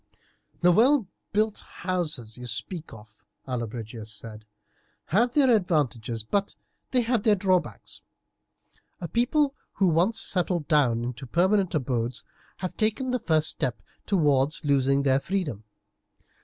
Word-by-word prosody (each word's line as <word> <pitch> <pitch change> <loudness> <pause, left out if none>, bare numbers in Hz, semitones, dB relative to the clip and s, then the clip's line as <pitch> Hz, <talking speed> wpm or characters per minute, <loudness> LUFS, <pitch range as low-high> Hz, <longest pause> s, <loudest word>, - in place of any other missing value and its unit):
"The 180 0 +6
well 245 +6 +4 0.3
built 215 +1 +1
houses 155 - -3
you 125 0 -8
speak 160 - -5
of," 110 -1 -15 0.2
Allobrigius 115 -3 -5
said, 110 0 -8 0.6
"have 235 +8 +2
their 265 -5 +5
advantages, 130 - -1
but 200 - -1 0.3
they 255 - +3
have 235 -1 +1
their 210 0 +4
drawbacks. 185 - -1 1.0
A 170 - -4
people 275 - +1 0.2
who 195 - +1
once 180 +8 +2
settle 180 -4 0
down 140 -7 +2
into 125 +2 -5
permanent 185 - +2
abodes 125 -2 -2 0.3
have 185 -1 -5
taken 225 +4 0
the 250 - 0
first 160 -7 +2
step 125 -2 -2 0.3
towards 150 -5 +2
losing 140 -1 +2
their 135 -1 +3
freedom. 145 - -3
160 Hz, 130 wpm, -26 LUFS, 125-205 Hz, 1.0 s, The